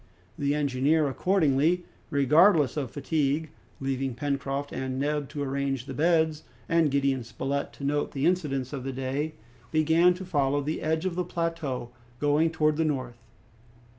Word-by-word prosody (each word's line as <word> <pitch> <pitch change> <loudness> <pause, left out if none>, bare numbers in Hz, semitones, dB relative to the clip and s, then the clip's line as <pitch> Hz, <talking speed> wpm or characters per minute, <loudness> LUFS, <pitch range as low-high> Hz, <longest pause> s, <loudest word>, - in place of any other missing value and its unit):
The 145 0 0
engineer, 145 +2 +2
accordingly, 165 +1 +2 0.2
regardless 150 - +4
of 140 -5 -2
fatigue, 145 +2 -1 0.3
leaving 135 -1 -2
Pencroft 140 +1 -2
and 130 0 -3
Neb 145 0 -1
to 145 0 -4
arrange 135 -2 -2
the 135 - -6
beds, 160 +1 +2 0.3
and 165 -2 +3
Gideon 135 -2 +1
Spilett 135 +5 -3
to - - -11
note 145 +1 0
the 135 +1 -1
incidents 150 -7 0
of 135 -3 -4
the 135 0 -4
day, 135 +4 -3 0.3
began 160 +4 +4
to 190 +1 -7
follow 145 -4 +1
the 150 +3 -3
edge 160 +2 0
of 185 - 0
the 180 +1 -1
plateau, 165 -8 -3 0.3
going 150 +2 +3
towards 155 -1 +1
the - - +4
north. 130 -5 -3
145 Hz, 155 wpm, -27 LUFS, 135-160 Hz, 0.3 s, regardless